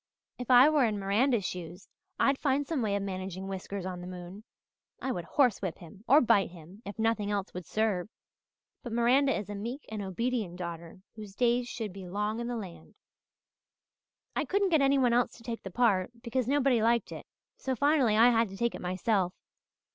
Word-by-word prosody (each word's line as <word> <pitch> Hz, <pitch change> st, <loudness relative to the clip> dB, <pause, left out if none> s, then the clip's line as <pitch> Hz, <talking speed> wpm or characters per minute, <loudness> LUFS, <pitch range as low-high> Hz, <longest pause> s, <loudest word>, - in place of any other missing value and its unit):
If 250 Hz, -, -6 dB
I 250 Hz, +2 st, +8 dB
were 305 Hz, -3 st, +3 dB
in 215 Hz, -2 st, -1 dB
Miranda's 205 Hz, +3 st, +1 dB
shoes 175 Hz, 0 st, -6 dB, 0.3 s
I'd 275 Hz, 0 st, +3 dB
find 285 Hz, 0 st, +1 dB
some 300 Hz, -3 st, -2 dB
way 205 Hz, -3 st, 0 dB
of 200 Hz, -, -1 dB
managing 190 Hz, -1 st, -5 dB
Whiskers 195 Hz, 0 st, -5 dB
on 180 Hz, -1 st, -5 dB
the 180 Hz, -, -8 dB
moon. 180 Hz, +3 st, -9 dB, 0.6 s
I 265 Hz, -, -2 dB
would 175 Hz, -7 st, -4 dB
horse 250 Hz, +1 st, +2 dB
whip 185 Hz, -5 st, -3 dB
him, 185 Hz, +4 st, -14 dB
or 290 Hz, +4 st, +7 dB
bite 205 Hz, -5 st, +3 dB
him, 175 Hz, +4 st, -14 dB
if 200 Hz, -, -7 dB
nothing 225 Hz, -2 st, 0 dB
else 200 Hz, -2 st, -2 dB
would 180 Hz, -2 st, -7 dB
serve. 210 Hz, -4 st, 0 dB, 0.7 s
But 240 Hz, -, -7 dB
Miranda 255 Hz, +4 st, +3 dB
is 210 Hz, -, -5 dB
a 205 Hz, -, -6 dB
meek 235 Hz, +8 st, -5 dB
and 215 Hz, -1 st, -4 dB
obedient 205 Hz, 0 st, -2 dB
daughter 170 Hz, 0 st, -7 dB
whose 210 Hz, -3 st, -10 dB
days 245 Hz, +1 st, +2 dB
should 220 Hz, -6 st, -5 dB
be 190 Hz, -2 st, -9 dB
long 210 Hz, +4 st, -2 dB
in 235 Hz, -, -3 dB
the 240 Hz, -1 st, -3 dB
land. 190 Hz, -6 st, -9 dB, 1.4 s
"I -, -, +1 dB
couldn't 400 Hz, 0 st, +1 dB
get 320 Hz, -4 st, +3 dB
anyone 270 Hz, -3 st, +3 dB
else 245 Hz, +1 st, +2 dB
to 230 Hz, -, -15 dB
take 230 Hz, -1 st, -5 dB
the 195 Hz, -, -7 dB
part, 195 Hz, -3 st, +2 dB
because 250 Hz, 0 st, -1 dB
nobody 270 Hz, -4 st, +3 dB
liked 235 Hz, +1 st, +2 dB
it, -, -, -8 dB, 0.3 s
so 260 Hz, -1 st, -3 dB
finally 275 Hz, -5 st, +3 dB
I 235 Hz, +2 st, +7 dB
had 230 Hz, -2 st, +2 dB
to 195 Hz, -, -9 dB
take 235 Hz, +2 st, 0 dB
it -, -, -7 dB
myself. 185 Hz, +1 st, 0 dB
220 Hz, 200 wpm, -30 LUFS, 190-245 Hz, 1.4 s, I